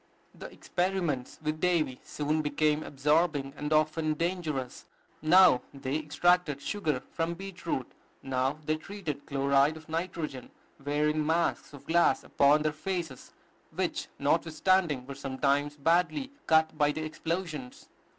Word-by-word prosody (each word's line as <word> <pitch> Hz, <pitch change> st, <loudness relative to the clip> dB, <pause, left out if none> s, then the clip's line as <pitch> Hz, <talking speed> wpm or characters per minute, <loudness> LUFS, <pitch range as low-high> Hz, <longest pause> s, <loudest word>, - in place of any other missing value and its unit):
The -, -, -10 dB
experiments 175 Hz, -8 st, -2 dB
with 155 Hz, +1 st, -2 dB
Davy 165 Hz, -8 st, +1 dB
soon 150 Hz, +1 st, -1 dB
became 150 Hz, +1 st, +1 dB
absorbing, 150 Hz, -1 st, +1 dB
and 150 Hz, +1 st, -4 dB
often 155 Hz, 0 st, +2 dB
dangerous. 160 Hz, -6 st, -3 dB, 0.4 s
Now 165 Hz, -5 st, +6 dB
they 135 Hz, 0 st, -3 dB
extracted 155 Hz, 0 st, +2 dB
sugar 155 Hz, -6 st, -2 dB
from 165 Hz, +1 st, -2 dB
beet 190 Hz, -2 st, -9 dB
root; 130 Hz, -6 st, -2 dB, 0.3 s
now 135 Hz, +2 st, 0 dB
they 155 Hz, +1 st, +1 dB
treated 160 Hz, -5 st, -6 dB
chloride 140 Hz, +2 st, +2 dB
of 155 Hz, -, -14 dB
nitrogen, 160 Hz, -5 st, -4 dB, 0.3 s
wearing 150 Hz, +2 st, +1 dB
masks 165 Hz, +2 st, 0 dB
of 145 Hz, -2 st, -13 dB
glass 170 Hz, -4 st, +3 dB
upon 145 Hz, +2 st, +3 dB
their 155 Hz, -, +1 dB
faces, 165 Hz, -5 st, -5 dB, 0.4 s
which, -, -, -2 dB
notwithstanding, 160 Hz, -4 st, +1 dB
were 140 Hz, -, -7 dB
sometimes 140 Hz, +2 st, -1 dB
badly 180 Hz, -, +1 dB, 0.2 s
cut 160 Hz, 0 st, +4 dB
by 145 Hz, -1 st, +3 dB
the 155 Hz, +1 st, -4 dB
explosions. 155 Hz, -4 st, -5 dB
155 Hz, 130 wpm, -29 LUFS, 140-170 Hz, 0.4 s, Now